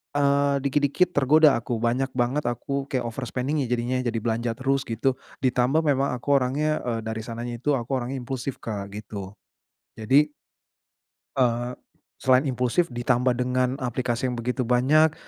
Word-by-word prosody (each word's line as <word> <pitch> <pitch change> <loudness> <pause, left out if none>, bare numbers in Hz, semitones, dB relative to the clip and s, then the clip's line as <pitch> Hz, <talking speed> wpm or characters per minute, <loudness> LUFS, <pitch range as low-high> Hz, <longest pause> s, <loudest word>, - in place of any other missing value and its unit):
eee, 140 0 +3
dikit-dikit 145 +6 +2
tergoda 145 -1 +5
aku. 120 +1 -3
Banyak 125 +4 -1
banget 125 +3 0
aku 135 +3 -2
kayak 130 -3 -1
overspending-nya 130 +3 -2
jadinya 125 +1 0
jadi 120 -2 -1
belanja 115 0 0
terus 135 +2 0
gitu. 130 +3 0 0.2
Ditambah 130 +5 +2
memang 140 -3 +1
aku 140 +3 +2
orangnya, 150 +4 0
eee, 115 -1 -1
dari 110 0 -4
sananya 120 +2 -5
itu 145 +4 +1
aku 130 +1 -1
orangnya 125 +3 -4
impulsif 130 +1 -4
Kak, 100 -3 -4
gitu. 105 -2 -7 0.6
Jadi 140 +7 +3 1.0
Eee, 120 -1 +1 0.4
selain 130 0 +4
impulsif 130 +4 0
ditambah 125 +1 +1
dengan 125 +2 0
aplikasi 125 0 -1
yang 125 - -2
begitu 125 +1 -2
banyak, 150 +6 +4
125 Hz, 145 wpm, -25 LUFS, 120-140 Hz, 1.0 s, tergoda